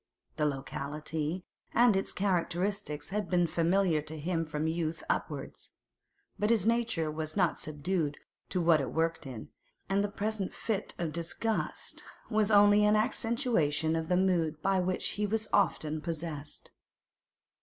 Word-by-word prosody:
The 150 -1 +2
locality 150 +4 -3 0.3
and 235 -3 +6
its 195 - 0
characteristics 185 -3 -1
had 210 -2 -2
been 175 -1 +3
familiar 170 0 +2
to 155 +1 -8
him 165 +1 -1
from 150 0 -2
youth 160 0 -2
upwards; - - -4 0.7
but 210 - +2
his 225 -5 +3
nature 230 -9 +1
was 155 +3 -4
not 175 -4 +2
subdued 155 0 -1 0.3
to 185 - 0
what 165 -3 +4
it 135 - -3
worked 165 -2 0
in, 120 -5 -8 0.4
and 195 +1 +2
the 205 - -1
present 205 -1 -2
fit 215 -4 -2
of 165 -3 -2
disgust 175 +6 -2 0.3
was 215 -1 +3
only 205 0 +6
an 210 0 +5
accentuation 215 - +1
of 160 0 -2
a 180 - +3
mood 170 -5 +2
by 195 -1 +3
which 185 0 0
he 210 0 -1
was 220 +1 0
often 155 -6 +2
possessed. 160 -3 -5
175 Hz, 145 wpm, -31 LUFS, 155-205 Hz, 0.7 s, and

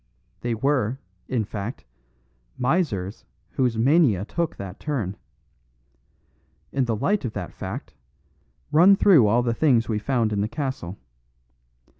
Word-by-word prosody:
They 120 -1 -2
were, 130 -1 0 0.3
in 120 -5 -1
fact, 105 +3 -6 0.7
misers 125 - -1 0.3
whose 125 -4 0
mania 120 - +3
took 170 +6 -2
that 95 -1 -8
turn. 115 -11 -3 1.6
In 135 -2 +1
the 115 -2 0
light 190 - 0
of 120 -4 -3
that - - -6
fact, - - -7 0.8
run 175 +6 +7
through 170 - +6
all 120 +4 +3
the 120 -1 0
things 120 -4 +3
we 110 -2 -1
found 115 -2 0
in 100 - 0
the 105 - 0
castle. 115 - -4
120 Hz, 130 wpm, -24 LUFS, 105-145 Hz, 1.6 s, run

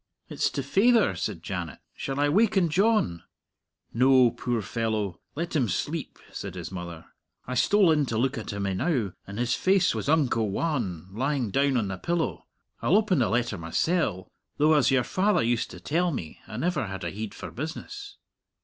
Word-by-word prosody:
"It's - - 0
to 140 - -2
faither," 200 - +3
said 90 -1 -4
Janet. 85 -5 -4 0.2
"Shall 135 +1 -4
I 145 - +3
waken 195 +1 +3
John?" 195 - +2 0.7
"No; 130 0 +5
puir 120 -3 -2
fellow, 110 -5 -2 0.2
let 170 +2 -3
him 130 -7 +2
sleep," 150 - -3
said - - -6
his - - -6
mother. 85 -3 -7 0.4
"I 130 - -4
stole 190 - +4
in 150 -3 +2
to 115 - -2
look 130 +3 +1
at 115 - -5
him 100 -1 -3
enow, 105 - 0
and 100 +1 -7
his 120 +1 +1
face 190 -1 +3
was - - -3
unco 145 -7 +3
wan 100 - -2
lying 130 +1 -1
down 140 +1 +2
on 105 -5 0
the 95 - -4
pillow. 170 - -2 0.3
I'll 180 - +3
open 205 -7 +2
the 120 - +2
letter 120 -4 0
mysell; 95 - 0 0.3
though, 155 +2 +4
as 145 -4 +4
your 130 -2 +3
faither 200 - +2
used 115 0 0
to - - -10
tell 175 +4 0
me, 85 - -6
I 110 - -7
never 155 - 0
had 95 -1 -6
a 85 - -3
heid 105 +1 -6
for - - -7
business." 165 - -7
130 Hz, 185 wpm, -27 LUFS, 100-165 Hz, 0.7 s, No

